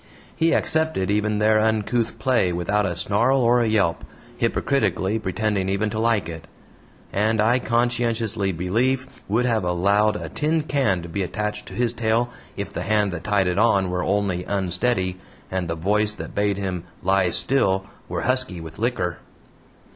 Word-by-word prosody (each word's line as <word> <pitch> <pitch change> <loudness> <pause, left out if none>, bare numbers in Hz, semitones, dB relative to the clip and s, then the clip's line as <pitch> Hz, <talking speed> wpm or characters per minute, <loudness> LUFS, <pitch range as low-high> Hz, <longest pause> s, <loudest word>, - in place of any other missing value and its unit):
He 165 0 +2
accepted 160 - +1
even 105 0 +1
their 110 +1 +4
uncouth 110 +1 0
play 120 -9 +2
without 95 +4 0
a 90 - -3
snarl 110 +9 +2
or 120 +1 +4
a 115 - +1
yelp, 100 -6 +1 0.3
hypocritically 105 -5 0
pretending 100 -1 -1
even 100 +2 0
to 110 - -3
like 115 -5 +1
it; 80 -1 -8 0.7
and 110 +2 +1
I 115 +4 +3
conscientiously 115 -4 0
believe 120 +10 0 0.2
would 115 +5 +1
have 115 -4 +1
allowed 100 +4 +2
a - - -5
tin 155 +1 0
can 130 - 0
to - - -7
be 90 +4 -3
attached 105 +3 -3
to - - -9
his 120 -1 0
tail 115 +1 0 0.3
if - - -5
the - - -3
hand 105 -2 +1
that 85 -2 -6
tied 100 -3 +2
it 90 +2 0
on 100 -5 +3
were 90 0 -1
only 95 -2 0
unsteady, 95 0 -1 0.3
and 95 -2 -1
the 85 - -2
voice 105 +5 +1
that - - -8
bade 100 -1 0
him 95 -3 -3 0.2
"lie 95 -1 +3
still" 95 -2 +1 0.2
were - - -2
husky 130 -8 0
with 80 +1 -10
liquor. 110 -7 -1
105 Hz, 170 wpm, -23 LUFS, 95-115 Hz, 0.7 s, their